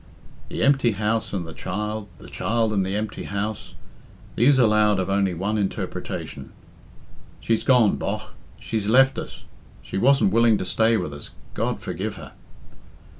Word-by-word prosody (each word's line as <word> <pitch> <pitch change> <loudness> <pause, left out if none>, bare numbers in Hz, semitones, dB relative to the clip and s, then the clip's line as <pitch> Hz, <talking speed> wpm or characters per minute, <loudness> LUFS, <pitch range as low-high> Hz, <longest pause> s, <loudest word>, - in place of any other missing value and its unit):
The - - -2
empty 135 -5 +3
house 110 +2 -1
and 95 -4 -3
the 80 - -9
child, 105 +4 -4
the - - -13
child 115 -1 0
and 100 -2 +2
the 95 +1 -2
empty 105 0 -4
house; 100 +1 -4 0.6
these 130 +4 +4
allowed 105 -4 +4
of 95 +1 -1
only 100 -2 +1
one 105 +5 -1
interpretation. 100 -2 -4 0.9
"She's 115 -1 0
gone, 125 -6 +4
bogh, - - -4 0.3
she's 110 -3 -3
left 135 +4 +5
us; - - -8 0.4
she - - -4
wasn't 135 -5 +4
willing 115 -1 +5
to 95 - -4
stay 110 +4 +2
with 75 - -4
us, 70 - -7 0.2
God - - -2
forgive - - -4
her!" - - -10
105 Hz, 155 wpm, -23 LUFS, 100-115 Hz, 0.9 s, left